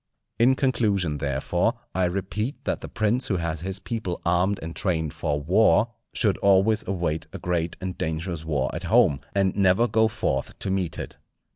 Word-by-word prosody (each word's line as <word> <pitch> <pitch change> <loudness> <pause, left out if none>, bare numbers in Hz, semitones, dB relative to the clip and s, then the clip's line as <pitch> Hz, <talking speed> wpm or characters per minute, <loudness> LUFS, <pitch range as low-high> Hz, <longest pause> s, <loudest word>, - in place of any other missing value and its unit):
In 125 +3 +5
conclusion, 105 - +1
therefore, 80 - 0 0.2
I 95 -1 +1
repeat 100 +8 -2
that - - -1
the - - -8
prince 115 +3 0
who 95 - 0
has 85 -2 -3
his 95 +2 -2
people 105 -5 -4
armed 90 +3 +2
and 80 +1 -6
trained 80 -6 -1
for 75 -1 -1
war, 95 +6 +4 0.2
should 105 -5 +1
always 100 +3 +4
await 85 -4 -2
a - - -4
great 85 -2 -2
and 95 -1 -4
dangerous 80 +1 -3
war 75 -4 -1
at - - -5
home, 70 - +4 0.2
and 95 -1 +2
never 100 +4 +4
go 110 +1 +3
forth 65 -11 -2
to 95 - -2
meet 95 -4 -1
it. - - -7
95 Hz, 175 wpm, -25 LUFS, 80-105 Hz, 0.2 s, In